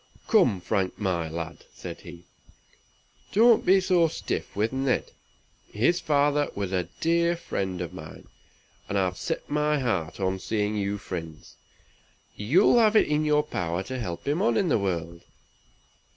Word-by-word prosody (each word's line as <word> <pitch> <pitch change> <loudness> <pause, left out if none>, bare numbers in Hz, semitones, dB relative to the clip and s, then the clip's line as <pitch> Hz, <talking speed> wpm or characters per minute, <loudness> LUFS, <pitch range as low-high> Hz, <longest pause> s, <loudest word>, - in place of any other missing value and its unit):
"Come, 125 - +3
Frank, 95 +1 -1
my 90 -5 -1
lad!" 85 0 -6
said - - -8
he, 85 -1 -12 1.1
"don't 230 +2 +5
be 190 +1 +5
so 180 -3 +3
stiff - - -4
with 110 +4 0
Ned. 135 -1 0 0.6
His 130 +12 +2
father 145 -1 +2
was 100 -2 -3
a 90 -2 0 0.2
dear 170 +1 +2
friend 95 - -3
of 85 - -5
mine, - - -10 0.6
and 100 - 0
I've 90 -2 0
set - - -4
my 150 +1 +1
heart 105 - -2
on 95 0 -1
seeing 105 +2 -1
you 100 0 -1
friends. 80 -6 -8 0.8
You'll 170 - +4
have 220 -1 +4
it - - +5
in 150 +1 +1
your 150 0 +3
power 90 - -3
to 130 +4 -5
help 90 -3 -5
him 150 +6 +1
on 115 -1 +2
in 180 - +1
the 125 - +3
world." 85 -3 -3
105 Hz, 155 wpm, -26 LUFS, 90-150 Hz, 1.1 s, don't